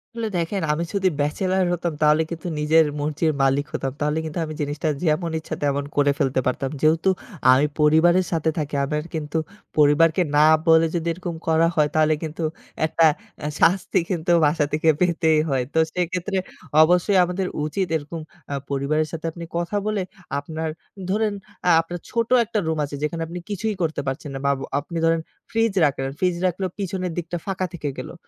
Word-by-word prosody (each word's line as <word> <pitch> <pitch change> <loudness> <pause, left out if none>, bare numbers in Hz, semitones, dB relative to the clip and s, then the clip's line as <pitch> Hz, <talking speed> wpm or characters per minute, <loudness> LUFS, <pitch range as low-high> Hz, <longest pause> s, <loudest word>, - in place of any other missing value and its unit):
আসলে 230 -2 -2
দেখেন 185 +4 -2
আমি 165 - -1
যদি 190 -2 +2
ব্যাচেলর 185 +6 +1
হতাম, 170 -1 -2
তাহলে 150 +1 +5
কিন্তু 170 +1 -5
নিজের 160 +1 +4
মর্জির 155 +2 0
মালিক 135 +2 +2
হতাম। 135 - -2
তাহলে 150 +1 +1
কিন্তু 155 +1 -5
আমি 155 - -6
জিনিসটা 150 +2 -2 0.2
যেমন 160 +2 +1
ইচ্ছা, - - -6
তেমন 140 0 +1
করে 145 0 +4
ফেলতে 130 -1 +1
পারতাম। 130 +1 -1
যেহেতু 160 +4 +3 0.4
আমি 135 +3 +5
পরিবারের 165 +4 +4
সাথে 160 -1 +1
থাকি, 150 -2 -2
আমার 150 +1 -2
কিন্তু 155 0 -3 0.4
পরিবারকে 155 +4 +4
না 150 - +7 0.2
বলে 160 0 +6
যদি 170 0 -2
এরকম 175 -1 -5
করা 165 +1 +4
হয়, 150 -1 +3
তাহলে 155 0 +4
কিন্তু 160 +1 -4 0.4
একটা 165 +1 +3 0.3
অ্যা 150 - -3
শাস্তি 180 +1 +3
কিন্তু 175 -1 -1
বাসা 150 0 +2
থেকে 155 +1 0
পেতেই 165 -3 +3
হয়। 130 -2 +1
তো 160 - +3
সেক্ষেত্রে 180 +2 -1 0.5
অবশ্যই 180 +4 +3
আমাদের 180 +1 -1 0.2
উচিত 185 +4 -1
এরকম 155 +2 -7 0.3
আ - - -1 0.2
পরিবারের 155 +3 0
সাথে 165 0 -6
আপনি 170 +1 -9
কথা 175 +4 -1
বলে, 210 -2 0 0.4
আপনার 160 +2 -4 0.4
ধরেন 210 +1 +1 0.3
আ - - +6
আপনার 175 +2 -7
ছোট 230 -1 0 0.2
একটা 215 -1 -1
রুম 160 0 0
আছে, 145 - -7
যেখানে 165 +2 -2
আপনি 175 +2 -6
কিছুই 210 +1 -2
করতে 160 -1 -1
পারছেন 135 +2 -3
না। - - -4
বা 140 - +4
বো - - -6 0.2
আপনি 170 +4 -6
ধরেন 165 0 +2 0.3
ফ্রিজ 225 -2 +1
রাখলেন। 135 -1 -1
ফ্রিজ 180 -2 +1
রাখলেও 185 +1 0
পিছনের 185 -2 -2
দিকটা 175 0 -3
ফাঁকা 190 -1 -2
থেকে 150 -4 -3
গেলো। - - -6
160 Hz, 180 wpm, -23 LUFS, 150-180 Hz, 0.5 s, না